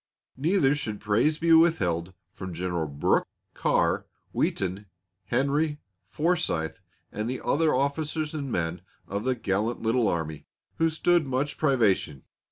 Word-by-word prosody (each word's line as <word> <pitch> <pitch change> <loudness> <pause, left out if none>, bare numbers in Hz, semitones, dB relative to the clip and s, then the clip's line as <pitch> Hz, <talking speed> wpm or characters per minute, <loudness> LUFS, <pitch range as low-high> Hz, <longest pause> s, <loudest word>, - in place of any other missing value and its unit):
Neither 150 0 +3
should 110 -8 -3
praise 115 +9 +2
be 165 0 +3
withheld 95 - +3 0.2
from 95 -2 -7
Generals 85 -5 -3
Brooke, - - +2 0.3
Carr, - - +1 0.2
Wheaton, 95 +2 -1 0.4
Henry, 145 +5 +1 0.3
Forsythe, 150 - 0 0.3
and 110 +2 -3
the 130 - -3
other 160 +1 +2
officers 150 +3 -1
and 140 -4 -4
men 85 -1 -2 0.3
of 100 +3 -3
the 130 -1 +2
gallant 110 +1 -1
little 115 0 +2
army, 80 -4 -3 0.3
who 165 0 +3
stood 165 0 +2
much 135 +2 -1
privation. 110 - +2
125 Hz, 130 wpm, -27 LUFS, 95-155 Hz, 0.4 s, Neither